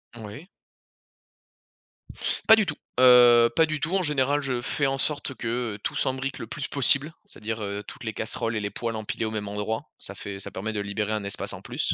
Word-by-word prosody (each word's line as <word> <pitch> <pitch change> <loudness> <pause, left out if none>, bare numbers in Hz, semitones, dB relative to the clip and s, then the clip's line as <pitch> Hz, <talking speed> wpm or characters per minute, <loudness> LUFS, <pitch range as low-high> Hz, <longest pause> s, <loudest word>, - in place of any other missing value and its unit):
Oui. 110 - -9 2.0
Pas 220 - +11
du 220 -2 +2
tout! 155 -5 -4 0.2
Heu, 120 -2 +8
pas 165 - +6
du 155 -1 -4
tout. 165 - -2
En 190 - 0
général, 145 -2 +2
je 130 -4 -2
fais 145 +3 0
en 135 0 -1
sorte 145 0 +3
que, 120 -1 -2
heu, - - -11
tout - - -2
s'imbrique 130 +1 -2
le 115 - -6
plus 140 +5 -5
possible, 140 +3 +1
c'est-à-dire, 110 +1 -4
heu, 100 0 -4
toutes - - -10
les 110 - -3
casseroles 115 +1 -2
et 110 - -1
les 105 - -2
poêles 115 +3 -4
empilées 110 +1 -3
au 110 - -3
même 105 -2 -4
endroit. 105 +2 -3 0.2
Ça - - -2
fait 100 -1 -7
ça - - -8
permet 110 +4 -4
de 105 - -3
libérer 100 +1 -2
un 105 -2 -2
espace 100 - -3
en - - -7
plus, - - -2
115 Hz, 215 wpm, -26 LUFS, 105-140 Hz, 2.0 s, Pas